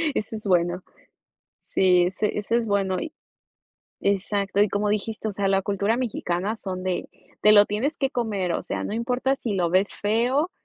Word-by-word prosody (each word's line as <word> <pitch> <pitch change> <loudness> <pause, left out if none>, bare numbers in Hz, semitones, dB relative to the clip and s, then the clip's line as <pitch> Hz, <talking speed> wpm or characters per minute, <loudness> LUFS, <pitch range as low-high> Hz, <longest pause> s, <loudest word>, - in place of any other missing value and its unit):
Eso 220 +1 -3
es 215 - -8
bueno. 180 -1 +1 0.8
Sí, 180 -2 +3
ese 205 +4 -1
ese 220 +3 0
es 235 - 0
bueno 195 -3 0
y 315 - -5 0.9
Exacto, 200 0 0
y 210 - +5
como 205 +2 -1
dijiste, 215 +1 -2
o 210 - -3
sea, 195 0 -1
la 195 0 +2
cultura 200 +3 0
mexicana 210 -4 -2
son 185 -3 -5
de: 185 -1 -2 0.3
"Te 210 +2 +6
lo 205 -1 +7
tienes 245 +9 -1
que 270 -1 0
comer", 205 -7 -1
o - - -1
sea, - - -3
no - - -4
importa 250 +3 0
si 225 -6 -3
lo 175 -3 +1
ves 190 +2 +2
feo, 245 - +1
205 Hz, 185 wpm, -24 LUFS, 190-225 Hz, 0.9 s, lo